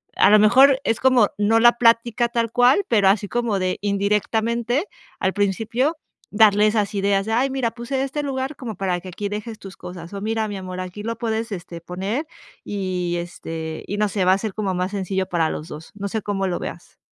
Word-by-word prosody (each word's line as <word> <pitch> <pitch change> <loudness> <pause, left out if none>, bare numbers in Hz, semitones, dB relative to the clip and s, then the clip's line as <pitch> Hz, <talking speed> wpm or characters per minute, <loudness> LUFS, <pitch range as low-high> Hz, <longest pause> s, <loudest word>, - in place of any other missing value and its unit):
a - - +5
lo 215 - +7
mejor 260 +5 +6
es 225 -4 0
como 255 -5 +4
no 220 +2 +3
la 240 0 +7
plática 235 0 +3
tal 230 -1 -1
cual, 250 +11 +4
pero, 205 -5 +4
así 205 0 +1
como 235 -4 0
de 185 0 -1
indirectamente, 220 - 0 0.3
al 190 - +1
principio 225 - 0 0.3
darle 210 0 +5
esas 210 -1 0
ideas 195 0 +1
de: 220 - -3
"Ay, 260 +4 +2
mira, 250 -4 -1
puse 250 +3 -3
este 290 +2 -3
lugar 270 +1 -3
como 230 -5 -6
para 185 -1 -1
que 185 - -9
aquí 200 +3 -4
dejes 215 +1 -6
tus 195 -1 -11
cosas 180 0 -9
o 200 - -4
mira, 220 0 -1
mi 200 - -5
amor, 185 -1 -6
aquí 185 +3 -7
lo 230 +1 -3
puedes, 225 -1 -2
este, 170 -2 -7
poner", 195 - -3 0.4
y 185 -3 -2
este, 165 -2 -6
y 205 - -3
no 210 -1 +1
sé, 190 -1 0
va 185 - +5
a - - +2
ser 215 -2 -4
como 200 -3 -1
más 180 +1 -2
sencillo 190 -1 -2
para 165 -3 +1
los 155 - -6
2. 155 +2 -9
No 200 0 -4
sé, 220 +1 -2
cómo 195 -2 -1
lo 175 - -2
veas. - - -8
210 Hz, 215 wpm, -22 LUFS, 190-235 Hz, 0.4 s, lo